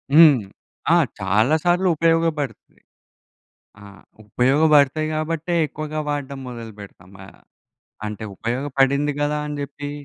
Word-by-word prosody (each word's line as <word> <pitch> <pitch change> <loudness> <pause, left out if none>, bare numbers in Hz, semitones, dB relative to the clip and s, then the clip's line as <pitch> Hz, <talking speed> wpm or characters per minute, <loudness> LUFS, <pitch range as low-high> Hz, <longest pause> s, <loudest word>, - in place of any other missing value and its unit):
హ్మ్. 150 -7 +7 0.5
ఆ! - - +6 0.2
చాలా 105 +10 +2
సార్లు 175 +2 +2
ఉపయోగపడుతది. 165 -6 -1 1.0
ఆ! - - -13 0.4
ఉపయోగపడతయి 145 +5 +3
గాబట్టే 165 +2 -2
ఎక్కువగా 155 +1 -5
వాడడం 140 -2 -4
మొదలుపెడతాం 105 -6 -11
గదా! 95 - -14 0.7
అంటే 105 +1 -7
ఉపయోగపడింది 140 +3 0
గదా! 150 0 0
అని 150 0 -5
జెప్పి 145 0 -6
145 Hz, 100 wpm, -21 LUFS, 125-155 Hz, 1.0 s, హ్మ్